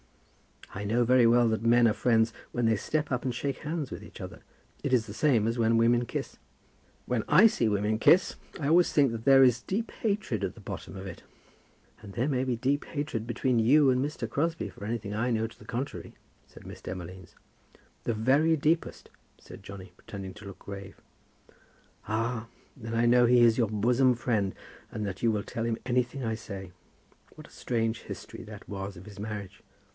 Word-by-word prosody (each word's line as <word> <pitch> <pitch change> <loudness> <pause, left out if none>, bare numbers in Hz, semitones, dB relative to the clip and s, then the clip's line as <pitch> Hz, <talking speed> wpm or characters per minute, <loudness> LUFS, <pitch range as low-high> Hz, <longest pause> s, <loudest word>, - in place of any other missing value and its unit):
"I 100 - -5
know 115 +4 +2
very 125 0 +5
well 120 0 +5
that 110 -1 -1
men 120 +1 +5
are 110 - +3
friends 115 -1 +2 0.2
when 120 -1 0
they 110 -1 +3
step 150 +7 -2
up 125 -1 -1
and 125 -3 -2
shake 140 +2 -3
hands 150 -2 -4
with - - -6
each - - -12
other. - - -8 0.4
It - - -1
is 120 -3 +3
the 105 - -8
same 120 -4 +2
as 115 +2 -1
when 115 0 +3
women 120 +1 +3
kiss." - - -5 0.7
"When 120 -3 -1
I 175 +9 +7
see 125 - +3
women 105 +1 0
kiss, 180 +9 +5 0.2
I 145 -2 -1
always 175 +2 +5
think 140 -4 +3
that 115 -1 -6
there 135 -1 +7
is 125 -1 +4
deep 215 - -3
hatred 200 - -2
at - - -5
the - - -13
bottom - - -7
of 95 0 -7
it." 90 -3 -9 0.8
"And 100 -2 -11
there 125 +8 0
may 130 -2 0
be 125 -2 0
deep 135 +5 0
hatred 145 -7 -4
between 125 +1 +1
you 135 +5 +5
and 130 +1 +1
Mr. 145 -5 -3
Crosbie 160 +7 -1
for 100 - -10
anything 110 -2 -3
I 115 +4 0
know 110 -2 +1
to 115 - -10
the 105 - -14
contrary," 125 +6 -5 0.3
said - - -15
Miss - - -10
Demolines. 90 -1 -8 0.7
"The 115 - +1
very 135 +9 +3
deepest," 160 +2 -1 0.3
said - - -13
Johnny, 95 -2 -10
pretending 95 -2 -8
to 105 - -12
look 100 -1 -10
grave. 100 -1 -9 1.1
"Ah; 115 +1 -2 0.3
then 115 -2 -5
I 115 +1 +3
know 120 +1 +5
he 120 0 +5
is 115 -1 +5
your 115 -3 +3
bosom 120 +4 +3
friend, 110 -5 -1 0.3
and 105 - -4
that 100 -2 -5
you 115 - +3
will 105 -2 -1
tell 115 - -4
him 115 -1 -1
anything 125 +1 0
I 110 -1 -1
say. 95 -4 -8 0.6
What - - -12
a - - -22
strange 115 -2 -2
history - - -8
that 105 -1 -11
was 100 -1 -5
of 90 - -12
his 100 -2 -12
marriage!" 105 -1 -6
115 Hz, 200 wpm, -28 LUFS, 105-130 Hz, 1.1 s, I